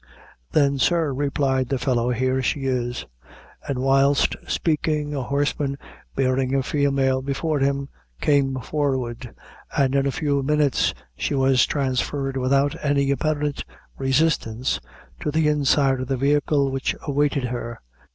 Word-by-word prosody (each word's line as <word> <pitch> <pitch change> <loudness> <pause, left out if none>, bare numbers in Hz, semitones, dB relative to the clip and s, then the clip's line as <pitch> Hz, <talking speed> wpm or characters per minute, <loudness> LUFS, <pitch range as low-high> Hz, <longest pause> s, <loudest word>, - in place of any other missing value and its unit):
"Then, 140 -2 +3
sir," 165 -2 +2
replied 135 -2 0
the 135 - 0
fellow, 120 -1 0
"here 130 +2 0
she 135 +3 -1
is;" 125 -2 -2 0.6
and 140 - -2
whilst 135 +2 +3
speaking, 150 -2 0
a 140 - -2
horseman, 140 +1 -1 0.4
bearing 130 0 +1
a 135 - +1
female 135 -1 +1
before 140 +3 -1
him, 140 0 0 0.3
came 140 -2 +2
forward, 130 -4 -2 0.5
and 135 -1 +3
in 140 0 +2
a - - +1
few 145 -1 0
minutes 150 -1 +1 0.2
she 140 - -2
was 130 -2 +3
transferred 135 0 -1
without 135 +2 +2
any 140 -1 +2
apparent 145 +1 -1 0.3
resistance, 135 -3 0 0.4
to - - -2
the 155 +1 +2
inside 140 -2 +2
of 130 - -4
the 135 0 -1
vehicle 140 +1 +2
which 135 0 -1
awaited 145 -2 0
her. 120 -1 -4
135 Hz, 135 wpm, -23 LUFS, 130-145 Hz, 0.6 s, Then